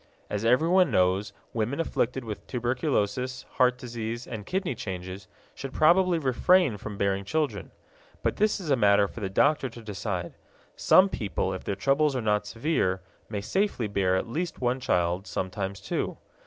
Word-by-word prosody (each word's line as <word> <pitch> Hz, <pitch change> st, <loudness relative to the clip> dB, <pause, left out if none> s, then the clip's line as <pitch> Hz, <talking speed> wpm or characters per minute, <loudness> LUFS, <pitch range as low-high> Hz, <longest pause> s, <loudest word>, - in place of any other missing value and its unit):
As 105 Hz, +1 st, -2 dB
everyone 165 Hz, +10 st, +4 dB
knows, 95 Hz, +3 st, +2 dB, 0.2 s
women 115 Hz, +6 st, -1 dB
afflicted 130 Hz, -5 st, -1 dB
with 105 Hz, -2 st, -7 dB
tuberculosis, 125 Hz, -1 st, -1 dB
heart 125 Hz, 0 st, +4 dB
disease, 120 Hz, -1 st, -5 dB
and 105 Hz, -3 st, -7 dB
kidney 185 Hz, -4 st, -1 dB
changes 95 Hz, -2 st, -6 dB, 0.3 s
should 135 Hz, -1 st, -7 dB
probably 175 Hz, +3 st, +4 dB
refrain 150 Hz, -, +3 dB
from 100 Hz, 0 st, -7 dB
bearing 100 Hz, -1 st, 0 dB
children. 115 Hz, -, -2 dB, 0.5 s
But -, -, 0 dB
this 215 Hz, 0 st, +2 dB
is 165 Hz, -6 st, -3 dB
a -, -, +6 dB
matter 100 Hz, -3 st, +4 dB
for 115 Hz, -, -10 dB
the 100 Hz, -3 st, -3 dB
doctor 140 Hz, +6 st, +2 dB
to 115 Hz, 0 st, -12 dB
decide. 100 Hz, -4 st, -4 dB, 0.4 s
Such 190 Hz, +1 st, +5 dB
people, 95 Hz, -, -2 dB
if 95 Hz, -, -6 dB
their 100 Hz, -, -2 dB
troubles 140 Hz, +6 st, +2 dB
are -, -, 0 dB
not 105 Hz, -2 st, 0 dB
severe, 115 Hz, -, 0 dB, 0.3 s
may 105 Hz, -2 st, -3 dB
safely 190 Hz, -, 0 dB
bear 95 Hz, -2 st, +1 dB
at 95 Hz, -, -1 dB
least 165 Hz, +9 st, -3 dB
one 125 Hz, +1 st, 0 dB
child, 90 Hz, -6 st, 0 dB
sometimes 95 Hz, +2 st, -3 dB
two. 100 Hz, -, -3 dB
115 Hz, 165 wpm, -27 LUFS, 100-140 Hz, 0.5 s, a